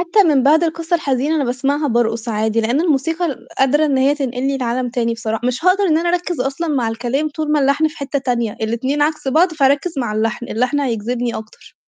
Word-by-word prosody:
حتى 375 +4 +3
من 275 -4 +3
بعد 315 +4 +4
القصة 330 +1 -1
الحزينة 280 0 0
اللي 295 - +1
باسمعها 275 +4 -1
بارقص 235 -1 0
عادي، 220 +1 0
لإن 235 +6 +1
الموسيقى 325 +2 0
ال 280 - -6
قادرة 280 +4 +3
إن 275 -3 +1
هي 275 +2 +3
تنقلني 270 0 -2
لعالم 245 0 -2
تاني 235 -2 -1
بصرا 225 -1 -3
مش 250 +6 -1
هاقدر 385 +2 +4
إن 320 -3 +3
أنا 345 - -1
أركّز 350 -4 -1
أصلًا 275 +6 -2
مع 255 -6 0
الكلام 245 +7 -2
طول 305 0 -3
ما 300 - +3
اللحن 280 +3 +2
في 310 - -15
حتّة 280 0 -2
تانية، 240 -4 -1
الاتنين 240 +7 -1
عكس 305 -2 -1
بعض 330 +6 +3
فهاركّز 285 +2 +1
مع 235 -4 -2
اللحن، 225 +2 -2
اللحن 250 +5 0
هيجذبني 240 -1 -2
أكتر. 215 0 -12
270 Hz, 210 wpm, -18 LUFS, 240-310 Hz, -, بعد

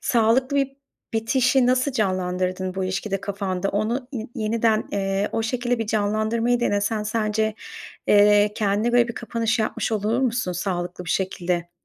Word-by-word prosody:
sağlıklı 250 +4 +2
bir 275 0 0 0.4
bitişi 250 +3 +2
nasıl 255 +2 +2
canlandırdın 185 -3 -1
bu 190 -1 -2
ilişkide 195 +1 -2
kafanda? 195 -1 -2
Onu, 235 +5 -1
i 225 -3 -5
yeniden, 220 -1 +1
eee, 195 0 0
o 225 - 0
şekilde 245 +1 -1
bir 225 - -2
canlandırmayı 220 +3 +1
denesen 210 -1 0
sence, 215 0 0 0.5
eee, 205 0 +5
kendine 210 +3 0
böyle 240 -1 +4
bir 235 - -5
kapanış 230 0 -1
yapmış 220 +1 -1
olur 215 +3 0
musun 240 -7 0
sağlıklı 180 0 -3
bir 170 - -4
şekilde? 175 -2 -1
215 Hz, 145 wpm, -23 LUFS, 195-235 Hz, 0.5 s, eee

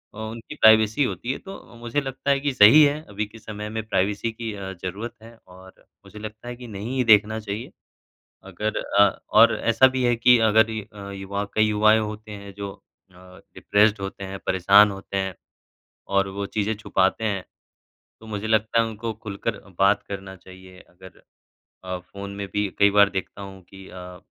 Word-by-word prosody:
अ, - - -13
उनकी 115 +6 -7
प्राइवेसी 110 +2 +5
होती 125 +1 -3
है। - - -6
तो 195 -10 -12
मुझे 120 +4 -2
लगता 135 +1 -5
है 140 - +2
कि 140 -1 -1
सही 115 +8 +8
है 145 +1 +1
अभी 105 +1 -3
के 115 +2 -15
समय 105 0 -7
में 110 0 -4
प्राइवेसी 105 +3 0
की 110 -1 -6
अ, 95 -1 -7
ज़रूरत 105 +6 -5
है 115 0 -14
और 95 +1 -17 0.2
मुझे 105 - -12
लगता 110 +2 -9
है 120 - -6
कि 125 -1 -10
नहीं 110 +4 -6
ही 125 - +2
देखना 110 0 +4
चाहिए, 105 +1 -6 0.7
अगर 110 0 -4 0.2
अ, 100 -1 +4
और 115 +2 +6
ऐसा 115 +3 +4
भी 130 -1 -2
है 120 -1 +3
कि 125 +1 +5
अगर 110 0 +4
ये 110 -1 -4
अ, 100 -1 -9
युवा 100 +1 -4
कई 110 - +3
युवाएँ 110 +1 +4
होते 105 0 -6
हैं 100 -1 -9
जो 100 -1 -5 0.4
अ, - - -23 0.4
डिप्रेस्ड 105 0 +2
होते 95 0 -6
हैं, 95 0 -7
परेशान 100 +3 +5
होते 95 0 -6
हैं 95 -2 -2 0.7
और 100 0 +1
वो 100 +1 -5
चीज़ें 105 +2 -2
छुपाते 95 +1 0
हैं, 100 -4 -2 0.8
तो 110 - -14
मुझे 105 -1 -5
लगता 110 +1 +2
है 115 - +1
उनको 110 +1 -5
खुलकर 105 0 -5
अ, - - -20
बात 100 +1 +3
करना 95 -1 -7
चाहिए। 95 0 -15
अगर 95 +1 -17 0.6
अ, 90 0 -4
फ़ोन 100 +2 -10
में 100 - -4
भी 105 -1 0
कई 100 0 +5
बार 100 0 +5
देखता 95 +1 -5
हूँ 95 -1 -10
कि 95 +1 -14
अ, 90 -1 -10
105 Hz, 195 wpm, -23 LUFS, 100-110 Hz, 0.8 s, सही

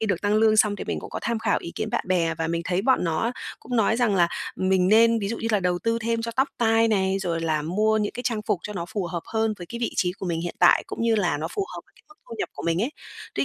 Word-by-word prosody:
khi 220 - -1
được 190 -4 0
tăng 205 0 +2
lương 215 0 +4
xong 210 -1 +4
thì - - -6
mình - - -3
cũng - - -9
có - - -4
tham 235 -1 -1
khảo 220 -1 +1
ý 170 - -7
kiến - - -3
bạn - - -1
bè, 170 -3 +1
và 165 - -2
mình 170 +1 -2
thấy 185 +1 0
bọn 260 -5 +3
nó 170 +8 0 0.3
cũng 245 +1 -4
nói 225 0 +3
rằng 235 -5 +2
là 175 -2 +4 0.3
mình 185 -1 +2
nên 230 +2 +5
ví 200 -2 -2
dụ 230 - -3
như 225 - -3
là 210 -3 +2
đầu 180 -1 0
tư 230 +4 0
thêm 230 0 -1
cho 230 - -3
tóc 265 +2 +3
tai 225 -1 +3
này, 195 -2 +1
rồi 170 -4 -2
là 160 -2 0
mua 215 +7 +1
những 210 -1 -1
cái 245 - -6
trang 230 -4 -1
phục 210 -6 0
cho 210 - -6
nó 175 -4 -4
phù 200 -4 -2
hợp 170 -1 -4
hơn 220 -1 +1
với 175 - -8
cái 235 +6 -7
vị 235 - -1
trí 180 -1 +1
của 195 0 -7
mình 165 -2 -1
hiện 175 0 -4
tại, 175 - +5
cũng - - -5
như 230 -1 +3
là 180 -8 +1
nó 155 - -3
phù 400 - 0
hợp - - -6
với - - -30
cái - - -22
mức 405 - -17
thu - - -7
nhập 410 - -2
của - - -8
mình 170 +3 +1
ấy. 245 - -1 0.4
Tuy - - +1
205 Hz, 320 wpm, -25 LUFS, 175-225 Hz, 0.4 s, nên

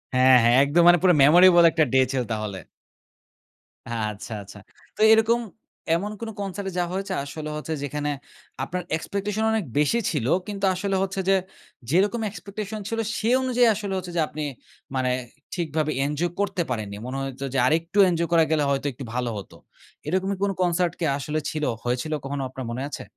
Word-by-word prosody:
হ্যাঁ, 130 0 +7
হ্যাঁ, 120 +1 +5
একদম 150 +5 +3
মানে 175 - +8
পুরো 180 -1 +5
memorable 175 +3 +7
একটা 160 - +3
day 130 0 +6
ছিল 130 -2 0
তাহলে। 105 -3 -4 1.3
এ - - -8 0.2
আচ্ছা, 105 +2 -10
আচ্ছা। 100 +1 -13 0.4
তো - - -6
এরকম 225 +2 +3 0.6
এমন 200 +5 -2
কোনো 225 - -4
concert 195 0 -4
এ - - -7
যাওয়া 175 0 -1
হয়েছে? 195 0 -3
আসলে 155 +2 -6
হচ্ছে 155 +1 -4
যেখানে 145 +1 -3 0.5
আপনার 180 +4 -4
expectation 200 +5 -3
অনেক 220 -4 0
বেশি 150 +11 +2
ছিল। 140 -8 -2 0.2
কিন্তু 200 -1 -2
আসলে 195 +1 -1
হচ্ছে 195 0 -3
যে, 195 - +6 0.6
যেরকম 205 +8 +2
expectation 210 +1 -6
ছিল 225 0 -2 0.2
সে 220 - 0
অনুযায়ী 250 -2 +3
আসলে 200 -2 -4
হচ্ছে 180 -1 -5
যে - - +3
আপনি 155 +1 -7 0.5
মানে 130 -1 +1 0.5
ঠিকভাবে 155 -3 -1
এঞ্জয় 150 +4 -1
করতে 200 -3 0
পারেননি। 105 -4 -3
মনে 130 +2 -4
হইতো 135 0 -6
যে - - 0
আরেকটু 165 +5 0
এঞ্জয় 170 -1 0
করা 165 -1 +5
গেলে 155 -2 +2
হয়তো 140 +1 -1
একটু 130 +2 -9
ভালো 125 -1 -1
হতো। 100 - -9 0.5
এরকমের 190 +4 0
কোনো 200 -1 +1
concert 175 -1 +1
কি 165 - 0
আসলে 150 +2 -2
ছিল? 155 -1 -4 0.2
হয়েছিল 125 +6 -2
কখনো? 140 0 -3
আপনার 130 0 -7
মনে 125 +3 -4
আছে? - - -6
170 Hz, 180 wpm, -24 LUFS, 140-195 Hz, 1.3 s, মানে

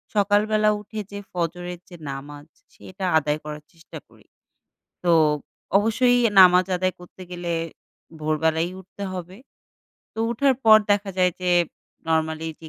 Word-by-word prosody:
সকালবেলা 210 +1 +3
উঠে 215 +1 -8
যে 200 - -6
ফজরের 175 0 -4
যে 175 - -11 0.2
নামাজ 145 +2 -9 0.3
সেটা 185 0 -7
আদায় 150 0 0
করার 150 0 -8
চেষ্টা 165 0 -12
করি। - - -22 0.8
তো 175 - +3 0.7
অবশ্যই 245 +4 +3 0.2
নামাজ 180 0 +7
আদায় 185 0 0
করতে 180 +1 -14
গেলে 175 -1 -4 0.7
ভোরবেলাই 160 +2 0
উঠতে 190 +2 -10
হবে। 180 +2 -7 0.8
তো - - -11
উঠার 265 +3 +2
পর 215 -1 +9
দেখা 205 -1 +1
যায় 180 -1 +3
যে 180 - 0 0.6
normally 160 0 0
যে 160 - -10
180 Hz, 130 wpm, -23 LUFS, 160-205 Hz, 0.8 s, পর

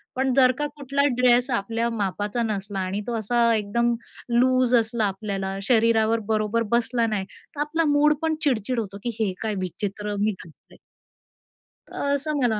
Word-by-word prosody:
पण 265 0 +1
जर 255 -1 +6
का 295 - -1
कुठला 280 0 -1 0.2
ड्रेस 250 +1 +4
आपल्या 230 +1 -1
मापाचा 205 +1 -2
नसला 200 -2 -3
आणि 190 +2 -2
तो 240 - -2
असा 235 +2 +2
एकदम 235 +3 +1 0.4
लूज 255 +1 +3
असला 225 -1 +1
आपल्याला, 195 -1 -3
शरीरावर 230 -1 +3
बरोबर 215 +1 +1
बसला 235 0 +2
नाही, 205 -3 -2 0.3
तर 290 - -3
आपला 320 +2 0
मूडपण 300 +2 +2
चिड-चिड 250 -3 0
होतो, 200 -2 -5
की 240 - -1
हे 200 -4 0
काय 215 -2 -2
विचित्र 205 +3 -4
मी 215 +1 +2
घातलय. 165 -3 -18 1.1
तर - - -6
असं 295 +1 -1
मला 220 -4 +2
230 Hz, 155 wpm, -24 LUFS, 210-250 Hz, 1.1 s, जर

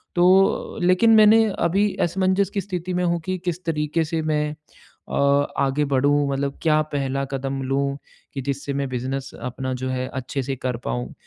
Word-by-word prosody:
तो 185 +2 +3
लेकिन 185 +6 +4
मैंने 220 +1 +7 0.2
अभी 195 +4 +2
असमंजस 190 +2 +1
की 200 - 0
स्थिति 180 -1 -4
में 180 - 0
हूँ 170 -1 +1
कि 185 0 -2
किस 175 +1 -3
तरीके 155 0 0
से 160 +1 -2
मैं 150 -1 0 0.6
अ, - - -7 0.5
आगे 140 +2 +1
बढ़ूँ, 140 +1 +2
मतलब 140 0 -2
क्या 155 -1 +4
पहला 135 -1 -1
कदम 135 0 -3
लूँ 140 +1 -1 0.4
कि 135 - -4
जिससे 140 +1 -3
मैं 140 0 -1
बिज़नेस 130 +2 -4
अपना 130 +1 -4
जो 130 - -2
है, 130 0 -2
अच्छे 130 +1 -3
से 135 +1 -3
कर 125 -2 -3
पाऊँ? 60 0 -3
145 Hz, 175 wpm, -23 LUFS, 135-180 Hz, 0.6 s, मैंने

